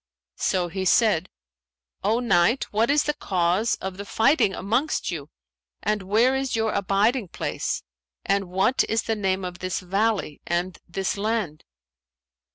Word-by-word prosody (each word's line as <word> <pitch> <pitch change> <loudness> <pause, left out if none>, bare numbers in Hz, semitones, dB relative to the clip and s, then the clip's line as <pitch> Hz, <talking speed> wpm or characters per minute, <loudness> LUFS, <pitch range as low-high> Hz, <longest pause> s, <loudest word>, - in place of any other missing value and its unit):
So 180 -2 +1
he 190 +3 -4
said, 190 -3 +3 0.7
'O 220 +4 +2
Knight, 235 +1 +3
what 225 +3 +2
is 295 +1 +4
the 295 - 0
cause 185 - +1
of 190 -1 -6
the 200 - -5
fighting 225 0 +2
amongst 235 +10 0
you - - -6 0.5
and 210 -1 0
where 220 +7 +3
is 265 -2 -1
your 220 -1 0
abiding 200 +4 +1
place - - -3 0.4
and 195 0 +1
what 190 +8 +2
is 225 +1 +1
the 225 - -1
name 190 -2 -1
of 180 0 -6
this 185 -1 -2
valley 195 -3 -1
and 175 +1 -1
this 190 +3 -2
land?' 205 -7 -2
200 Hz, 150 wpm, -24 LUFS, 185-225 Hz, 0.7 s, is